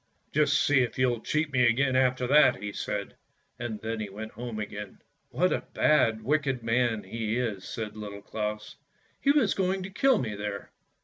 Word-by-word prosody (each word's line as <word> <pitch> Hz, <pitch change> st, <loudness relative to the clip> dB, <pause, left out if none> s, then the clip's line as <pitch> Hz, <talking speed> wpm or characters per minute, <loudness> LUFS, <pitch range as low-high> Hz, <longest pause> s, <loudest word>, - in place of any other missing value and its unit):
"Just 150 Hz, 0 st, +3 dB
see 145 Hz, -2 st, +4 dB
if 125 Hz, -, -2 dB
you'll 125 Hz, -2 st, +2 dB
cheat 150 Hz, +2 st, -1 dB
me 125 Hz, -1 st, +4 dB
again 130 Hz, +3 st, +2 dB
after 130 Hz, -1 st, +2 dB
that!" 145 Hz, +4 st, +6 dB
he 105 Hz, 0 st, -6 dB
said, -, -, -4 dB, 0.4 s
and 115 Hz, -3 st, -4 dB
then 110 Hz, 0 st, -3 dB
he 105 Hz, -2 st, -4 dB
went 110 Hz, +3 st, -7 dB
home 120 Hz, -2 st, -6 dB
again. 105 Hz, -1 st, -6 dB, 0.2 s
" -, -, -47 dB
What -, -, +1 dB
a -, -, -1 dB
bad, 115 Hz, -8 st, +3 dB
wicked 135 Hz, -2 st, 0 dB
man 115 Hz, -1 st, +1 dB
he 110 Hz, +3 st, -3 dB
is," 110 Hz, -6 st, -2 dB
said 110 Hz, -2 st, -5 dB
Little 100 Hz, -1 st, -8 dB
Claus; 105 Hz, 0 st, -4 dB, 0.2 s
" -, -, -38 dB
he 275 Hz, -, +1 dB
was 280 Hz, -8 st, +4 dB
going 190 Hz, 0 st, 0 dB
to 190 Hz, -, -7 dB
kill 265 Hz, +5 st, +3 dB
me 110 Hz, -4 st, -2 dB
there. 105 Hz, 0 st, -5 dB
120 Hz, 195 wpm, -28 LUFS, 105-140 Hz, 0.4 s, that